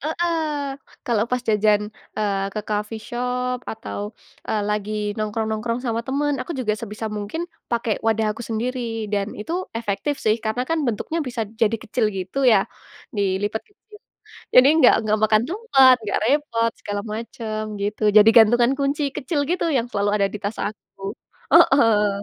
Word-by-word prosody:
heeh. 335 +3 -1 0.7
Kalau 225 -3 +1
pas 250 -1 0
jajan, 210 -1 +4 0.4
eee, 200 -2 0
ke 215 - -1
coffee 215 +1 -3
shop, 250 +1 -2
atau, 220 -2 -6 0.5
eee, 215 -1 0
lagi 210 0 -2 0.2
nongkrong-nongkrong 220 +2 -2
sama 230 -1 0
teman, 290 +2 0
aku 340 - -4
juga 225 -5 0
sebisa 220 0 -5
mungkin 210 +11 -4 0.2
pakai 235 -2 -1
wadah 220 -1 +2
aku 225 - -11
sendiri. 240 +3 -3 0.3
Dan, 200 0 -1
itu 215 +11 -5 0.2
efektif, 230 +6 -2
sih. 215 0 +3
Karena, 220 +3 -1
kan, 325 +4 -1
bentuknya 315 +9 -2
bisa 230 -2 -2
jadi 220 +1 0
kecil 215 0 0
gitu, 190 +8 -4
ya. 205 -4 +5 0.5
Dilipat 200 +2 0
kecil. 405 - -31 0.8
Jadi, 255 +2 +8
nggak 260 -6 +7
nggak 215 0 +2
makan 215 +1 +4
tempat, 275 - +5
nggak 205 - -1
repot, 235 -6 +1
segala 205 0 -3
macam, 220 -1 -5 0.2
gitu. 210 +1 -3
Jadi 210 +1 +9
gantungan 235 +3 +6
kunci 280 +2 0
kecil 285 +2 -1
gitu, 360 - 0
yang 235 - 0
selalu 205 0 0
ada 200 -1 +2
di 210 - -5
tas 205 +2 -3
aku. 200 -1 -6 0.4
Heeh. 210 -6 +5
220 Hz, 155 wpm, -22 LUFS, 210-250 Hz, 0.8 s, Jadi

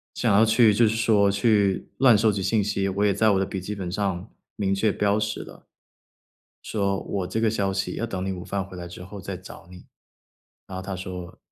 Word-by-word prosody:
想 115 -4 +1
要 105 +3 +6
去 115 -1 +5
就 115 +2 +4
是 110 - 0
说， 105 -3 +3
去， 100 -1 +2
乱 125 -4 +6
收 110 +1 +3
集 100 -1 -3
信 105 +2 +2
息， 100 -1 -1
我 100 +2 0
也 100 - +3
在 110 +3 +3
我 95 - +2
的 95 - +1
笔 95 0 -5
记 100 +3 -5
本 90 -3 -5
上， 95 0 -2 0.3
明 100 -2 0
确 105 +2 +2
标 100 +1 +1
识 105 0 -3
的。 - - -15 0.9
说： 100 -2 -1 0.2
“我 - - -4
这 110 - -2
个 115 - +3
消 100 -3 0
息 95 +1 -2
要 115 - -2
等 95 -5 -4
你 95 - -1
午 90 -1 -7
饭 100 +1 -2
回 95 0 -11
来 90 - -6
之 90 - -10
后 100 +2 -9
再 95 0 -5
找 90 -2 -12
你。” 90 -1 -13 0.8
然 95 - -9
后 - - -4
他 95 0 -5
说 90 -1 -7
100 Hz, 250 characters per minute, -25 LUFS, 95-105 Hz, 0.9 s, 要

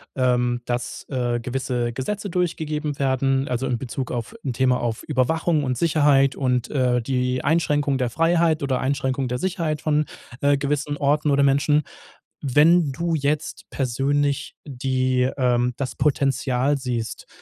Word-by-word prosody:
ähm, 125 -1 +1
dass, 120 0 -4
äh, 120 -3 -1
gewisse 125 -1 -2
Gesetze 200 - -3
durchgegeben 155 -4 -2
werden, 135 0 +1
also 125 +1 -1
in 125 -2 0
Bezug 130 +1 -5
auf 120 - -4
'n 135 - -2
Thema 125 +1 +2
auf 115 -2 -2
Überwachung 155 +3 +1
und 130 -2 -1
Sicherheit 145 -3 +3
und, 125 -3 0
äh, 125 -3 +2
die 125 0 -1
Einschränkung 145 -3 +1
der 125 - 0
Freiheit 165 +2 +2
oder 130 -2 0
Einschränkung 130 -1 -1
der 125 0 -2
Sicherheit 170 -5 -1
von, 150 0 +1 0.4
äh, 140 0 +3
gewissen 145 +1 -2
Orten 145 +1 +1
oder 140 0 +3
Menschen. 145 +2 +3 0.6
Wenn 150 +3 +4
du 170 +5 -2
jetzt 150 +3 -2
persönlich 140 +2 0
die 130 -2 0
ähm, 125 -1 +2
das 135 -2 -4
Potenzial 135 -1 +1
siehst, 120 -4 -4
135 Hz, 145 wpm, -23 LUFS, 125-150 Hz, 0.6 s, Wenn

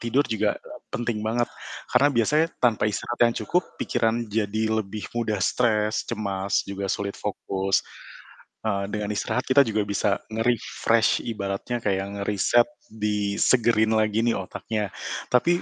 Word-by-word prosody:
tidur 120 +4 +2
juga, 110 -2 +1 0.4
penting 120 -2 -2
banget. 120 +2 0 0.4
Karena 135 +4 +5
biasanya 150 +7 +3
tanpa 115 -4 +3
istirahat 115 +3 -4
yang - - -15
cukup, 180 - +2 0.2
pikiran 115 +1 +1
jadi 110 0 -1 0.2
lebih 105 0 -6
mudah 110 -3 0
stres, 110 -3 +1
cemas, 100 -3 -1
juga 100 0 -3
sulit 100 -1 -3
fokus. 95 -1 0 0.9
Eee, 100 -2 0
dengan 105 -1 -2
istirahat 125 +4 -1
kita 130 +2 +6
juga 110 -2 0
bisa 100 0 +1 0.2
nge-refresh 115 0 +2
ibaratnya 100 +2 -3
kayak 95 -1 0 0.2
ngeriset, 105 +4 +3 0.2
disegerin 110 +2 +2
lagi 110 0 +2
nih 120 - +2
otaknya. 105 +2 -3 0.4
Tapi, 170 +8 +3
110 Hz, 130 wpm, -25 LUFS, 100-120 Hz, 0.9 s, kita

